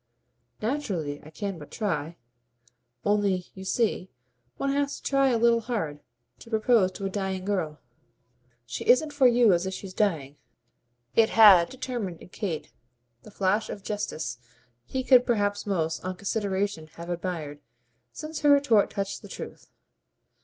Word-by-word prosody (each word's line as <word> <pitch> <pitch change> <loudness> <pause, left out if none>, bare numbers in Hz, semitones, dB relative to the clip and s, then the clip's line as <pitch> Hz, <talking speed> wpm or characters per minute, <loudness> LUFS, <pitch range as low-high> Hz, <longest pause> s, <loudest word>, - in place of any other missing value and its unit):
"Naturally 190 - -2
I 155 - -12
can 195 +2 -5
but 145 - -11
try. 170 -6 -3 0.9
Only, 200 -3 +1
you 190 - -9
see, 190 -2 0 0.5
one 275 - 0
has 280 0 0
to - - -16
try 275 0 +3
a 240 - +2
little 235 0 +4
hard 205 -11 -3 0.4
to 230 - -13
propose 220 -3 +3
to 195 - -6
a - - 0
dying 190 -2 -3
girl." 175 -7 -2 0.9
"She 120 - -5
isn't 295 +5 +4
for 275 -3 +5
you 240 -4 +5
as 175 +2 0
if 190 - -3
she's 190 -1 -8
dying." 155 -9 -1 0.8
It 225 -1 +5
had 200 -6 +7
determined 240 -9 -5
in - - -14
Kate 180 -6 -4 0.5
the - - -14
flash 200 +1 0
of 200 - -7
justesse 160 - -4 0.5
he 260 - -3
could 255 -1 +6
perhaps 205 -4 0
most, 165 -5 -1
on 185 0 -3
consideration, 200 -4 -2
have 170 +1 -7
admired, 170 -5 -4 0.5
since 310 - -6
her 295 - +3
retort 280 -8 +5
touched 200 -1 -4
the - - -12
truth. - - -9
200 Hz, 155 wpm, -27 LUFS, 175-230 Hz, 0.9 s, had